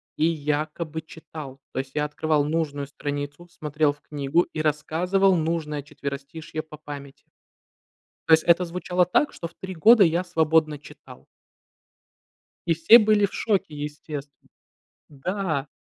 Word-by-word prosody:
и 155 - +2
якобы 155 +1 -2
читал. 155 -3 -10
То - - -2
есть, 135 0 -5
я 150 0 0
открывал 150 0 0
нужную 145 -2 -2
страницу, 145 +4 -5
смотрел 155 -3 0
в 145 - -15
книгу 145 +3 0
и 155 - -2
рассказывал 180 +6 +2
нужное 160 -3 -1
четверостишье 140 +3 -6
по 155 -1 -12
памяти. 145 -2 -9 1.1
То - - +4
есть 160 0 +6
это 170 +1 +4
звучало 180 +1 0
так, 180 +11 +1
что 170 - -6
в 165 - -25
3 190 0 -7
года 215 +6 +7
я 170 +1 +2
свободно 160 -3 +2
читал. 145 - -15 1.4
И 170 - +3
все 165 +9 +8
были 210 -2 +4
в - - -14
шоке 195 -8 0
естественно. 145 0 -6 0.8
Да. 155 0 -2
155 Hz, 140 wpm, -25 LUFS, 145-170 Hz, 1.4 s, все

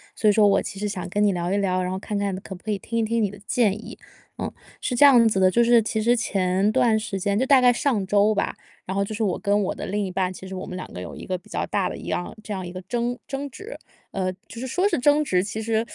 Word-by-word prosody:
所 215 - +3
以 - - +7
说 210 0 +5
我 200 -1 +4
其 195 - -7
实 210 - -1
想 195 -3 -4
跟 205 +3 -1
你 200 - +3
聊 175 0 -2
一 200 - +1
聊 185 -2 +1
然 180 - -2
后 190 - -3
看 205 +1 -4
看 200 -1 -1
可 190 0 -8
不 180 - -16
可 215 - -2
以 205 - 0
听 230 +4 -4
一 - - +2
听 230 +1 0
你 205 - +1
的 205 - -11
建 235 -7 +2
议。 - - -9 0.4
嗯， - - -3 0.3
是 250 - -1
这 285 - +7
样 240 -5 +7
子 195 - 0
的， 185 0 +5
就 235 +6 +3
是 235 0 +5
其 220 0 -2
实 235 +3 +4
前 195 -4 +1
段 225 -2 +3
时 215 -2 -4
间 200 +2 0
就 260 - +2
大 265 -1 +6
概 250 0 +6
上 240 -5 0
周 205 +2 +3
吧， 200 - 0 0.3
然 190 - -4
后 200 - 0
就 200 +2 -3
是 220 - -1
我 190 -4 0
跟 205 0 +1
我 190 - -1
的 - - -6
另 205 0 -1
一 185 - -5
半 185 0 -1
其 185 - -10
实 190 - -8
我 185 0 -5
们 185 - -7
两 185 - -5
个 - - -7
有 90 -1 -7
一 - - -9
个 185 - -2
比 180 - -20
较 - - -2
大 200 -3 0
的 - - -5
一 - - -9
样 175 - -3
这 215 - -5
样 185 -2 -4
一 175 - -8
个 185 - -6
争 240 +6 -2
争 280 +1 -4
执， 415 - -9 0.4
呃， 185 -1 -2
就 200 +4 -13
是 260 - -4
说 365 +10 +1
是 - - 0
争 290 +4 +4
执， 185 -11 +1
其 205 +3 -4
实 225 0 0
205 Hz, 335 characters per minute, -24 LUFS, 190-230 Hz, 0.4 s, 以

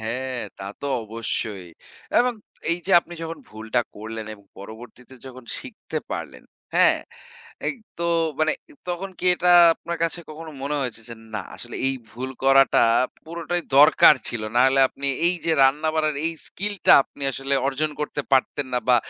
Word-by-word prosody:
হ্যাঁ, 125 +3 -4 0.2
তা 95 - -7 0.2
তো 140 - -4 0.2
অবশ্যই 110 -3 -4 0.5
এবং 250 0 +2 0.4
এই 170 - +2
যে, - - -2
আপনি 175 0 -12
যখন 165 0 -5
ভুলটা 110 +3 -2 0.2
করলেন 110 +1 -7
এবং 100 -1 -20
পরবর্তীতে 120 +5 -12
যখন 130 -1 -11
শিখতে 235 - -6
পারলেন, - - -6 0.3
হ্যাঁ? - - +5 0.7
এগ - - -1 0.2
তো - - -1 0.4
মানে 155 0 +3 0.4
তখন 185 +2 -3
কি - - -4
এটা 180 0 +1 0.3
আপনার 170 0 -6
কাছে 165 +1 -1
কখনো 160 +1 -9
মনে 145 +2 -2
হয়েছে 120 -3 -4
যে, - - -6 0.2
না 105 - -2
আসলে - - -8
এই 135 - 0
ভুল 130 +2 -6
করাটা 135 0 +5 0.5
পুরোটাই 170 +1 -3 0.2
দরকার 150 0 +8
ছিল? 120 -2 -3
নাহলে 130 +2 +4
আপনি 140 +1 -4 0.2
এই 180 - +2
যে, 165 - +2
রান্নাবাড়ার 155 +2 +1
এই 165 - +1 0.2
skill 205 +2 -4
টা - - +9
আপনি 140 - -17
আসলে 135 +2 -2
অর্জন 150 +3 -1
করতে 145 -1 -3
পারতেন 135 +1 +1
না 125 - +2
বা 125 - +7
135 Hz, 165 wpm, -23 LUFS, 120-160 Hz, 0.7 s, টা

